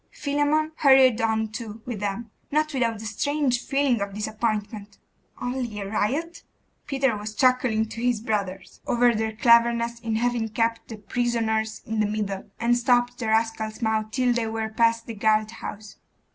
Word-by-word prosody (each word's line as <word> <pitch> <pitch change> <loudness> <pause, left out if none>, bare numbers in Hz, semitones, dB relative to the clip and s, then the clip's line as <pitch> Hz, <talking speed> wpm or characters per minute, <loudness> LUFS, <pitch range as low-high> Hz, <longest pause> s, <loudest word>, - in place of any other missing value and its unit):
Philammon 290 +2 0
hurried 265 -5 +5
on 220 -1 0
too 220 0 -7
with 240 -5 -5
them, 205 +2 -4 0.2
not 305 +1 +1
without 235 -4 +1
a 220 +1 -9
strange 260 +2 0
feeling 275 -5 +1
of 200 -1 -4
disappointment. 210 -1 -3 0.4
'Only 245 -4 -3
a 200 - -4
riot!' 275 +12 -2 0.5
Peter 270 -4 +1
was 210 +1 -6
chuckling 255 -3 +3
to 230 - -7
his 245 -2 +1
brothers 200 -4 -4
over 240 0 +4
their 220 0 -2
cleverness 235 0 +3
in 230 -2 -2
'having 235 -1 0
kept 230 +1 -1
the 225 - -8
prisoners 220 -1 -1
in 220 0 -3
the 210 - +2
middle, 205 -2 -3
and 240 +1 +2
stopped 245 0 +2
the 235 - -3
rascals' 220 0 0
mouths 220 -1 +1
till 250 0 +2
they 235 -2 -1
were 220 0 -3
past 230 +1 +2
the 230 - -6
guard 215 0 +2
house. 215 -2 -8
230 Hz, 165 wpm, -25 LUFS, 215-245 Hz, 0.5 s, hurried